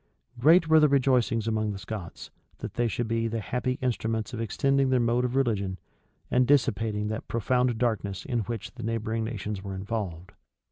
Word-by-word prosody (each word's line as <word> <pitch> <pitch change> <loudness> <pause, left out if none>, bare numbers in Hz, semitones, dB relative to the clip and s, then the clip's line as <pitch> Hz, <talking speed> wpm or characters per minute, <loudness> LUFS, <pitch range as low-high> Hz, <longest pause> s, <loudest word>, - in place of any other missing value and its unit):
Great 160 +6 +6
were 160 0 +6
the 150 - +6
rejoicings 125 -5 +2
among 110 -1 0
the - - -6
Scots, 100 -3 -7 0.3
that - - -7
they 120 0 +1
should 115 +1 -2
be 115 0 0
the 115 0 -2
happy 125 +4 -2
instruments 115 -1 -1
of 115 - -3
extending 135 +4 +1
their 130 -1 +3
mode 120 +1 +2
of 125 0 -1
religion, 100 -8 0 0.5
and 125 0 +3
dissipating 110 -6 +2
that 110 +1 -4
profound 125 +1 +1
darkness 110 -5 -1
in 120 -4 -1
which 115 0 -4
the 130 - -10
neighboring 115 0 -2
nations 105 -3 -4
were 95 -1 -6
involved. 95 -3 -4
115 Hz, 180 wpm, -27 LUFS, 105-125 Hz, 0.5 s, Great